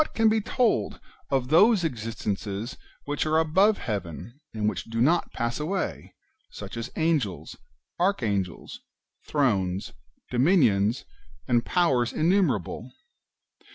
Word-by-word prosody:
233 225 Hz, -, -4 dB
can 220 Hz, -, +7 dB
be 220 Hz, 0 st, +2 dB, 0.2 s
told 245 Hz, -4 st, +1 dB, 0.3 s
of 135 Hz, -3 st, 0 dB
those 195 Hz, +5 st, +5 dB
existences 110 Hz, -4 st, -3 dB, 0.3 s
which 145 Hz, 0 st, -2 dB
are 155 Hz, +1 st, +2 dB
above 190 Hz, +7 st, +3 dB
heaven, 105 Hz, -, -6 dB
and 105 Hz, -1 st, -2 dB
which 105 Hz, -5 st, -2 dB
do 115 Hz, 0 st, -4 dB
not 160 Hz, +9 st, +2 dB
pass 120 Hz, +1 st, -2 dB
away, 185 Hz, +6 st, -3 dB, 0.3 s
such -, -, -9 dB
as 115 Hz, +2 st, -5 dB
Angels, 155 Hz, -, -1 dB, 0.4 s
Archangels, 105 Hz, -, -1 dB, 0.5 s
Thrones, 100 Hz, -10 st, 0 dB, 0.4 s
Dominions, 120 Hz, -, +3 dB, 0.4 s
and 120 Hz, -1 st, +2 dB
Powers 135 Hz, -9 st, +2 dB
innumerable 155 Hz, -, 0 dB
130 Hz, 115 wpm, -26 LUFS, 110-170 Hz, 0.5 s, can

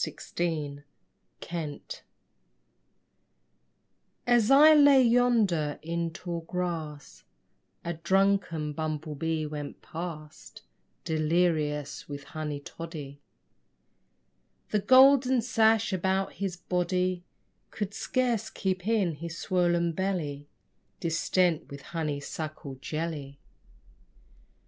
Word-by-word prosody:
BUMBLE 150 Hz, -5 st, -2 dB, 0.6 s
BEE 170 Hz, -, -6 dB, 2.2 s
As 240 Hz, -3 st, +3 dB
I 295 Hz, +3 st, +8 dB
lay 285 Hz, -2 st, +7 dB
yonder 230 Hz, -11 st, +2 dB
in 170 Hz, +1 st, -2 dB
tall 170 Hz, +1 st, -5 dB
grass 165 Hz, -4 st, -5 dB, 0.6 s
A 170 Hz, -, -1 dB
drunken 170 Hz, -3 st, +1 dB
bumble 155 Hz, 0 st, -3 dB
bee 160 Hz, +1 st, -2 dB
went 150 Hz, -1 st, -7 dB
past 160 Hz, -2 st, -8 dB, 0.4 s
Delirious 155 Hz, -3 st, 0 dB
with 140 Hz, 0 st, -6 dB
honey 150 Hz, -1 st, -5 dB
toddy. 145 Hz, -2 st, -8 dB, 1.5 s
The 210 Hz, -, +2 dB
golden 260 Hz, +2 st, +6 dB
sash 225 Hz, -2 st, +2 dB
about 190 Hz, +1 st, 0 dB
his 190 Hz, -3 st, -4 dB
body 180 Hz, 0 st, -1 dB, 0.5 s
Could 205 Hz, -2 st, -4 dB
scarce 235 Hz, -1 st, -1 dB
keep 185 Hz, -1 st, -3 dB
in 205 Hz, -7 st, +2 dB
his 165 Hz, +1 st, -6 dB
swollen 175 Hz, -2 st, +1 dB
belly 160 Hz, -6 st, -3 dB, 0.5 s
Distent 170 Hz, 0 st, +1 dB
with 140 Hz, 0 st, -9 dB
honey 155 Hz, -4 st, -2 dB
suckle 150 Hz, -1 st, -6 dB
jelly. 155 Hz, -3 st, -4 dB
170 Hz, 90 wpm, -28 LUFS, 155-195 Hz, 2.2 s, I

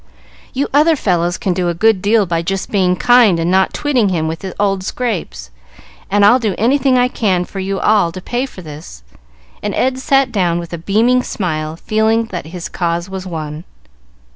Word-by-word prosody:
"You 275 Hz, +2 st, -1 dB
other 310 Hz, +3 st, +4 dB
fellows 175 Hz, -, 0 dB
can 190 Hz, -, -1 dB
do 175 Hz, -1 st, -1 dB
a 170 Hz, -, -2 dB
good 215 Hz, +1 st, +2 dB
deal 210 Hz, +1 st, +3 dB
by 165 Hz, -2 st, -1 dB
just 195 Hz, +3 st, -3 dB
being 185 Hz, -3 st, +2 dB
kind 235 Hz, -5 st, +4 dB
and 165 Hz, +2 st, 0 dB
not 190 Hz, 0 st, +3 dB
twitting 255 Hz, -8 st, +1 dB
him 165 Hz, -4 st, -1 dB
with 160 Hz, +3 st, -5 dB, 0.2 s
old 195 Hz, -2 st, 0 dB
scrapes, 185 Hz, -, -4 dB, 0.6 s
and 200 Hz, +1 st, +3 dB
I'll 240 Hz, +5 st, +6 dB
do 215 Hz, -5 st, -1 dB
anything 260 Hz, +3 st, +2 dB
I 250 Hz, 0 st, +3 dB
can 190 Hz, -7 st, 0 dB
for 195 Hz, -, -8 dB
you 195 Hz, 0 st, -2 dB
all 205 Hz, -5 st, +2 dB
to 185 Hz, -, -6 dB
pay 245 Hz, +8 st, -3 dB
for 185 Hz, -8 st, -12 dB
this;" 150 Hz, -, -11 dB, 0.6 s
and 205 Hz, -, -3 dB
Ed 260 Hz, 0 st, 0 dB
sat 270 Hz, -1 st, +2 dB
down 180 Hz, -6 st, +1 dB
with 170 Hz, -1 st, -6 dB
a 170 Hz, -, -4 dB
beaming 225 Hz, +8 st, +2 dB
smile, 155 Hz, -9 st, -3 dB
feeling 220 Hz, +5 st, +1 dB
that 175 Hz, -4 st, -5 dB
his 175 Hz, +1 st, -6 dB
cause 170 Hz, +1 st, -3 dB
was 190 Hz, -1 st, -6 dB
won. 155 Hz, -2 st, -6 dB
195 Hz, 190 wpm, -16 LUFS, 175-230 Hz, 0.6 s, I'll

